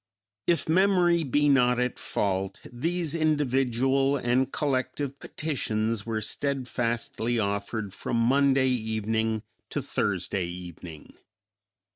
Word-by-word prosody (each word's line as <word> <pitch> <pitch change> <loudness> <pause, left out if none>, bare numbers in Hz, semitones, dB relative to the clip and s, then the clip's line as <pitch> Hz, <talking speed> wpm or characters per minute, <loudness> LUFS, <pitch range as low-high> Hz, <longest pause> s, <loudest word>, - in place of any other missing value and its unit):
If 170 -4 +2
memory 175 -1 +4
be 145 +1 +2
not 125 -3 +4
at 125 0 -1
fault, 95 -1 -2
these 165 +5 -1
individual 135 -3 +2
and 130 +1 +1
collective 140 0 -1
petitions 115 -7 -2
were 110 -1 -1
steadfastly 120 -2 -1
offered 100 0 -2
from 115 - -2
Monday 135 +2 +4
evening 110 -2 -1 0.3
to - - -2
Thursday 95 -3 -1
evening. 85 -3 -9
125 Hz, 100 wpm, -27 LUFS, 110-140 Hz, 0.3 s, memory